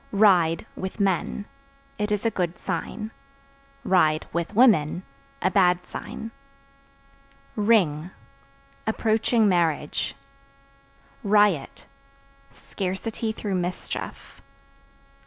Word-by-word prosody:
Ride 185 -6 +4
(With 190 +3 -6
men) 195 +1 0 0.5
it 210 0 -1
is 210 +1 0
a 230 - +3
good 175 -4 -2
sign; 220 0 -4 0.7
(with 170 -1 +1
women) 190 - +4 0.4
a - - +3
bad 180 -2 +3
sign. 225 +3 -7 1.2
Ring 185 -8 +2 0.8
Approaching 220 0 +2
marriage. 165 -7 0 1.1
Riot 205 -8 +2 0.7
Scarcity 200 +8 -4
through 210 -2 -4
mischief. 180 0 -5
195 Hz, 80 wpm, -25 LUFS, 175-215 Hz, 1.2 s, Ride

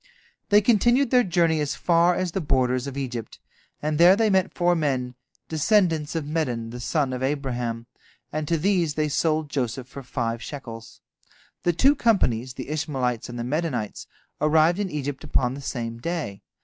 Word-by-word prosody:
They 210 0 +6
continued 240 +4 +3
their 250 -1 +6
journey 170 -4 +2
as 150 -1 -1
far 170 +1 +3
as 185 -1 -1
the 190 - -2
borders 130 -3 +1
of 140 0 -6
Egypt, 120 -5 -5 0.5
and 150 0 -1
there 175 +3 +8
they 220 0 +2
met 190 0 +2
four 175 0 +2
men, 130 -6 -1 0.3
descendants 160 -2 +1
of 160 -3 -2
Medan, 125 -7 -2
the 125 - -7
son 135 +1 0
of 125 - -4
Abraham, 125 -4 -2 0.5
and 155 0 -2
to 165 - +1
these 170 -3 +1
they 155 -1 +1
sold 155 0 0
Joseph 130 -2 -2
for 140 +1 -9
five 120 -3 -3
shekels. 115 -6 -9 0.6
The 175 - +1
two 270 - +5
companies, 130 - +1
the - - -7
Ishmaelites 135 -7 -2
and 120 - -6
the 120 - -3
Medanites, 135 -5 -3 0.3
arrived 160 +4 +4
in 200 -2 -1
Egypt 145 -3 -4
upon 125 -1 0
the 140 - -7
same 115 -4 -4
day. 155 - -4
150 Hz, 175 wpm, -24 LUFS, 125-170 Hz, 0.6 s, there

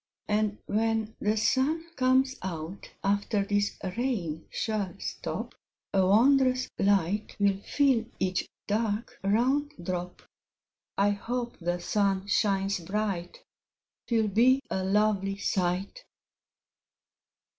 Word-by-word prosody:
And 210 0 +1
when 220 0 0
the 215 +1 +1
Sun 315 +9 +1
comes 260 0 +3
out, 175 +1 -6
After 200 +1 +1
this 205 0 0 0.2
Rain 195 -11 -2
shall 210 -4 -2
stop, - - -5 0.4
A 190 -1 +4
wondrous 255 +5 +4
Light 200 +1 +1
will 200 -1 +2
fill 265 -2 +2
Each 185 -1 0 0.2
dark, 215 +1 -1
round 260 +9 +2
drop; 180 0 -4 0.7
I 200 +1 +4
hope 240 +4 -3
the 175 0 -1
Sun 195 +1 +1
shines 200 -1 +1
bright; 190 -1 -3 0.6
'Twill 225 -3 +2
be 250 +6 +4
a 190 - 0
lovely 195 0 +1
sight. 190 - -1
205 Hz, 105 wpm, -28 LUFS, 195-235 Hz, 0.7 s, A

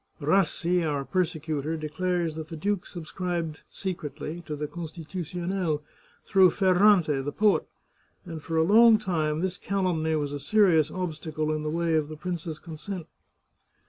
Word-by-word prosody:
Rassi, 175 +2 +2
our 145 -3 -1
persecutor, 160 -3 -1
declares 170 +2 -1
that 160 0 -6
the 165 - -7
duke 200 +3 -1
subscribed 170 -2 -4
secretly 170 -2 -5
to 150 - -3
the 150 +1 -3
Constitutionnel, 170 0 -3 0.4
through 190 -2 +6
Fer 190 +2 +2
rante, 180 -8 +4
the 145 - -3
poet; 210 +4 +2 0.6
and 165 -3 -7
for 165 +2 -3
a 160 - +5
long 220 +5 +7
time 160 -6 -1
this 185 0 -2
calumny 180 -5 0
was 145 -2 -2
a 145 - -3
serious 160 -1 +4
obstacle 155 -3 -3
in 155 - -2
the 150 - -2
way 165 +1 0
of 155 -2 +1
the 155 - -7
prince's 170 -1 -4
consent." 170 +3 -7
165 Hz, 150 wpm, -27 LUFS, 155-185 Hz, 0.6 s, long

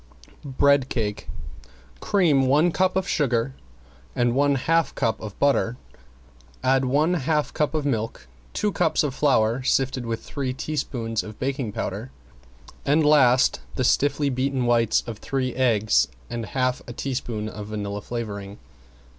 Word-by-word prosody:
~BREAD 140 -2 +4
CAKE 105 -4 -3 0.7
~Cream 160 -10 +2
one 150 +6 +4
cup 185 +2 +1
of 190 0 0
sugar 130 -6 0 0.6
and 120 -1 +2
one 140 +2 +3
half 165 +5 +1
cup 110 - -1
of 105 -2 -8
butter, 130 -4 +2 0.9
add 130 +1 +3
one 150 +7 +2
half 150 -2 0
cup 150 +1 0
of 150 -2 -1
milk, 115 - -2 0.3
two 210 - -1
cups 160 -5 +1
of 145 -3 -1
flour 125 -4 +2
sifted 130 -1 0
with 115 0 -3
three 135 -2 -3
teaspoons 125 -6 -3
of 110 0 -10
baking 130 -4 -2
powder 65 - -4 0.7
and 150 +2 +3
last 130 -4 +4
the 130 - 0
stiffly 140 +2 +2
beaten 130 0 -1
whites 115 -2 +2
of 115 -3 -7
three 130 -2 -2
eggs 110 - +2 0.2
and 115 -2 -4
half 125 -1 -1
a 120 - -7
teaspoon 120 -5 -3
of 105 -1 -7
vanilla 105 -1 -4
flavoring. 100 -3 -6
130 Hz, 145 wpm, -24 LUFS, 115-145 Hz, 0.9 s, ~BREAD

